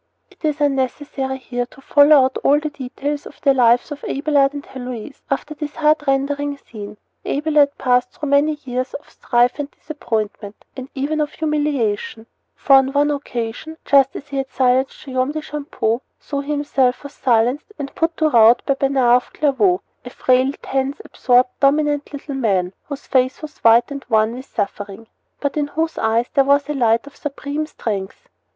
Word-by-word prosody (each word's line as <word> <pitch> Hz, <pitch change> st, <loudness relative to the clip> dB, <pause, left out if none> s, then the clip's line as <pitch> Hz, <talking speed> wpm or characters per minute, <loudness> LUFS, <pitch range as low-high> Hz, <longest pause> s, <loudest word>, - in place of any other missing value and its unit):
It -, -, -24 dB
is 305 Hz, -1 st, 0 dB
unnecessary 270 Hz, -1 st, -1 dB
here 245 Hz, -1 st, -4 dB
to 270 Hz, -, -18 dB
follow 285 Hz, +1 st, +6 dB
out 260 Hz, -, -2 dB
all 290 Hz, +1 st, +4 dB
the 305 Hz, 0 st, -4 dB
details 285 Hz, +1 st, -5 dB
of -, -, -15 dB
the 275 Hz, -, +4 dB
lives 245 Hz, +2 st, +3 dB
of 290 Hz, -, -7 dB
Abelard 280 Hz, -1 st, +2 dB
and 285 Hz, 0 st, -7 dB
Heloise 250 Hz, 0 st, -8 dB
after 290 Hz, +2 st, -2 dB
this 295 Hz, 0 st, -6 dB
heart 300 Hz, -1 st, +2 dB
rendering 285 Hz, +1 st, 0 dB
scene. 210 Hz, -5 st, -10 dB, 0.3 s
Abelard 295 Hz, -1 st, +2 dB
passed 250 Hz, -1 st, +2 dB
through 295 Hz, -, -6 dB
many 295 Hz, +2 st, +3 dB
years 255 Hz, 0 st, -3 dB
of -, -, -10 dB
strife 245 Hz, +3 st, +1 dB
and 290 Hz, -1 st, -3 dB
disappointment, 220 Hz, -9 st, -5 dB
and 260 Hz, 0 st, -8 dB
even 295 Hz, +3 st, -1 dB
of 295 Hz, -, -2 dB
humiliation; 285 Hz, -9 st, -1 dB, 0.3 s
for 275 Hz, -, +5 dB
on 270 Hz, 0 st, +2 dB
one 290 Hz, +1 st, +3 dB
occasion, 275 Hz, +2 st, -5 dB
just 275 Hz, -1 st, +4 dB
as 290 Hz, -, -8 dB
he 280 Hz, -, -4 dB
had 270 Hz, -1 st, -2 dB
silenced 260 Hz, +2 st, +1 dB
Guillaume 260 Hz, +1 st, -1 dB
de 310 Hz, -, -3 dB
Champeaux, 280 Hz, -6 st, -2 dB, 0.2 s
so 280 Hz, -, -4 dB
he 280 Hz, +1 st, -6 dB
himself 280 Hz, -4 st, +1 dB
was 285 Hz, 0 st, -9 dB
silenced 245 Hz, -, +1 dB
and 280 Hz, -1 st, -6 dB
put 330 Hz, 0 st, -1 dB
to 315 Hz, -, +3 dB
rout 235 Hz, -2 st, +6 dB
by 275 Hz, -, +2 dB
Bernard 265 Hz, -3 st, +3 dB
of 250 Hz, -, -7 dB
Clairvaux 220 Hz, -11 st, +2 dB, 0.2 s
"a 245 Hz, -, -8 dB
frail, 255 Hz, +1 st, +2 dB
tense, 270 Hz, +3 st, -2 dB
absorbed, 250 Hz, 0 st, +2 dB
dominant 290 Hz, +1 st, +2 dB
little 285 Hz, 0 st, -7 dB
man, 195 Hz, -8 st, 0 dB, 0.2 s
whose 285 Hz, -1 st, -6 dB
face 260 Hz, +3 st, +1 dB
was 300 Hz, -1 st, -9 dB
white 230 Hz, +3 st, +5 dB
and 280 Hz, -1 st, -6 dB
worn 220 Hz, 0 st, +3 dB
with 255 Hz, +2 st, -8 dB
suffering," 205 Hz, +1 st, -4 dB, 0.3 s
but 285 Hz, -, -2 dB
in 295 Hz, -1 st, 0 dB
whose 320 Hz, +2 st, -2 dB
eyes 225 Hz, +2 st, +1 dB
there 275 Hz, -, +4 dB
was 280 Hz, +1 st, +3 dB
a 295 Hz, -, -2 dB
light 230 Hz, -3 st, +2 dB
of 285 Hz, -, -13 dB
supreme 295 Hz, +1 st, -4 dB
strength. 210 Hz, -, -5 dB
275 Hz, 180 wpm, -20 LUFS, 245-290 Hz, 0.3 s, follow